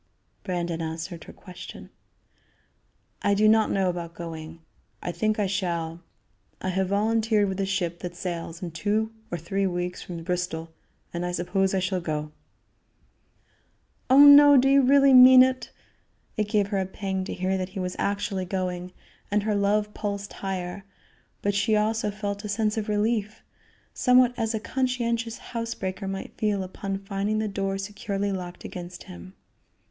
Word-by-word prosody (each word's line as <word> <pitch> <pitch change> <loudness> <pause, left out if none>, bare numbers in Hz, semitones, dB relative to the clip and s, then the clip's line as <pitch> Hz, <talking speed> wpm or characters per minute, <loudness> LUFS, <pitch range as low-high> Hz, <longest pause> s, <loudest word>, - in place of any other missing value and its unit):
Brandon 175 -3 -2
answered 165 +1 -5
her - - -10
question: 180 -1 -11 1.3
"I 200 - +2
do 215 +2 +4
not 220 0 +4
know 195 -1 +1
about 175 -1 -4
going; 165 -1 -8 0.4
I 175 - -4
think 215 +4 0
I 210 - +1
shall. 170 -4 -2 0.6
I 185 - -3
have 190 +1 0
volunteered 215 +1 +2
with 190 0 -3
a 195 - 0
ship 175 -3 -2
that 175 -1 -6
sails 170 0 -5
in 175 - -4
two 210 +6 -1 0.2
or 175 - -3
three 195 +4 -1
weeks 180 0 -3
from 170 -2 -7
Bristol, 165 -2 -3 0.4
and 170 0 -3
I 180 - -2
suppose 190 +2 0
I - - +2
shall 185 0 -1
go." 150 -2 -3 1.8
"Oh, 275 +3 +9
no! 285 0 +9
do 265 +1 +4
you 275 0 +6
really 275 +1 +5
mean 255 0 +10
it?" 260 0 -1 0.7
It 210 -1 0
gave 205 -2 +1
her 200 -2 0
a 190 - -1
pang 190 -1 -3
to - - -5
hear 185 +1 0
that 185 -1 -3
he 190 - -7
was 180 0 -3
actually 200 -2 -1
going, 180 -1 -3 0.4
and 205 0 +1
her 215 0 0
love 205 +1 +1
pulsed 205 -1 -4
higher; 190 0 -4 0.6
but 205 - +1
she 205 +2 +2
also 215 0 +1
felt 205 0 -4
a 210 - -5
sense 210 +1 0
of 215 -1 -3
relief, 215 0 -1 0.5
somewhat 250 -1 +4
as 225 -1 -1
a - - -1
conscientious 235 -2 -1 0.2
house 230 0 -3
breaker 190 +1 -4
might 195 0 -5
feel 210 -3 0
upon 195 +1 -4
finding 200 +2 -2
the 215 0 0
door 195 -1 -2
securely 200 0 -3
locked 180 -2 -6
against 175 0 -8
him. 90 +1 -11
195 Hz, 165 wpm, -26 LUFS, 180-215 Hz, 1.8 s, mean